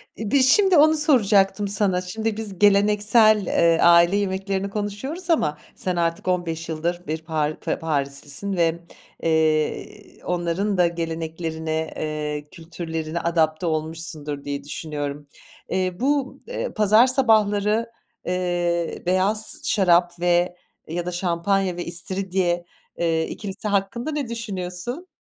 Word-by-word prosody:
İ 215 -2 -5
bir 280 - +4
şimdi 370 +8 +5
onu 310 +2 +6
soracaktım 205 -9 +3
sana, 195 -2 +3
şimdi 220 +4 -3
biz 205 -5 -4
geleneksel, 210 +1 +5
eee, 170 -1 +3
aile 170 +2 +6
yemeklerini 195 0 -2
konuşuyoruz 215 - -5
ama 150 - +1 0.2
sen 185 -1 -2
artık 170 +1 -1
15 165 -3 -2
yıldır 170 +2 -3
bir 160 +1 -3
par 155 -1 -2
f - - -2
Parislisin 145 +4 -2
ve, 170 -1 +1 0.4
eee, 160 -1 +1 0.3
i - - -23
onların 180 +3 -1
da 180 -1 +4
geleneklerine, 160 -1 -4
eee, 150 -1 -3
kültürlerine 165 -1 -5
adapte 165 0 0
olmuşsundur 155 -2 -3
diye 140 0 -4
düşünüyorum. 145 -1 -5 0.4
Eee, 185 -1 -1
bu, 275 0 0
eee, - - -4
pazar 215 +3 +5
sabahları, 220 -3 +2 0.4
eee, 175 -2 -1
beyaz 195 +4 +1
şarap 175 -3 +2
ve 175 0 +1 0.3
ya 170 +2 -4
da 180 - -3
şampanya 180 +1 0
ve 175 - -5
istiridye, 180 0 -1 0.3
eee, 165 -1 0
ikilisi 205 0 -6
hakkında 205 +7 -1
ne 290 -4 -3
düşünüyorsun? 230 - -5
180 Hz, 125 wpm, -23 LUFS, 165-205 Hz, 0.4 s, onu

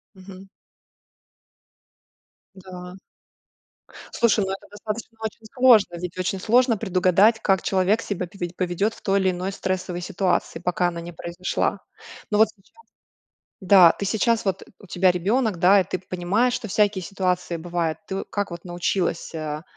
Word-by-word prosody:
Мгм. 190 0 -13 2.1
Да. 180 -1 -10 1.2
Слушай, 220 -3 +2
ну, 190 - -3
это 195 - -8
достаточно 215 +2 -7
очень 220 0 -6
сложно, 235 -8 +5
ведь 180 -1 -6
очень 185 +1 -1
сложно 240 +3 +3
предугадать, 190 +2 +3
как 190 -3 +2
человек 195 +3 +1
себя 185 -3 -3
пове 175 -1 -6
поведёт 185 +4 -1
в - - -18
той 195 0 +2
или 190 -1 +2
иной 180 +1 -3
стрессовой 185 -2 -3
ситуации, 180 -2 -1
пока 180 0 0
она 170 -1 -5
не 170 +1 -8
произошла. 170 +2 -3 0.5
Но 210 - +1
вот 220 0 +6
сейчас 195 -3 -30 0.8
да, 185 -3 +7
ты 200 - -5
сейчас, 220 +3 +1
вот, 195 -1 -1 0.2
у - - -14
тебя 180 +1 +3
ребёнок, 205 +4 0
да, 185 +4 +5
и - - -1
ты 185 - -4
п 185 - -27
понимаешь, 195 +8 +1
что 225 - -4
всякие 205 -1 +1
ситуации 180 -2 -2
бывают. 170 -1 -2
Ты 190 0 -3
как 205 -3 -3
вот 170 0 -8
научилась, 175 -1 -2
а, 155 -1 -5
190 Hz, 155 wpm, -23 LUFS, 175-205 Hz, 2.1 s, да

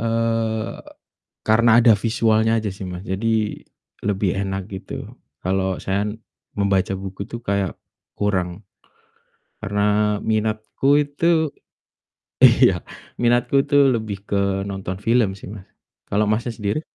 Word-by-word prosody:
eee, 115 -1 -1 0.7
karena 115 +2 +4
ada 115 -1 +6
visualnya 110 -1 +2
aja 110 - -4
sih, 95 - -8
Mas, 90 +1 -7
jadi 95 +4 -2 0.8
lebih 100 -1 0
enak 95 0 -2
gitu. 95 -2 -8 0.5
Kalo 95 0 -1
saya 100 +1 -1 0.6
membaca 100 -1 +1
buku 95 +1 -5
tuh 120 - -5
kayak 100 -2 0 0.5
kurang, 95 -1 -1 0.9
karena 100 +1 -2 0.4
minatku 110 +3 -1 0.2
itu 160 +1 +1 0.9
iya, - - +7 0.5
minatku 120 +2 +2
itu 145 - -2 0.2
lebih 110 -3 -3
ke 100 -1 0
nonton 95 -1 -4
film 115 -3 +3
sih, - - -11
Mas. 100 -3 -11 0.4
Kalo 105 +1 +2
Masnya 110 +3 0
sendiri? 105 +7 -1
105 Hz, 115 wpm, -22 LUFS, 95-115 Hz, 0.9 s, iya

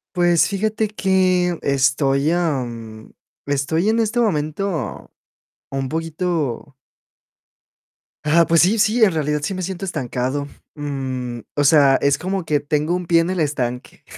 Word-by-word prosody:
Pues, 175 -1 +3
fíjate 215 +2 -1
que 185 -3 +1
estoy, 140 +1 +2
am, 120 -10 -3 0.3
estoy 145 +7 0
en 225 +1 +2
este 225 +2 0
momento 170 -3 -2 0.6
un 135 -1 -3
poquito. 160 -4 -3 1.5
Ah, 165 +2 +4
pues 165 -2 +4
sí, 205 +6 +3
sí, 220 +2 +3
en 195 - +5
realidad 150 -1 -1
sí 190 - -2
me 185 - -4
siento 190 +1 -4
estancado. 135 -3 -3 0.3
Mm, 130 -4 -4 0.2
o 145 - +1
sea, 140 -2 +5
es 140 0 +2
como 185 0 -3
que 150 -2 +1
tengo 150 +3 -1
un 180 0 -3
pie 165 0 +4
en 165 - -2
el 185 -1 -2
estanque, 125 -5 -3
155 Hz, 140 wpm, -20 LUFS, 140-185 Hz, 1.5 s, en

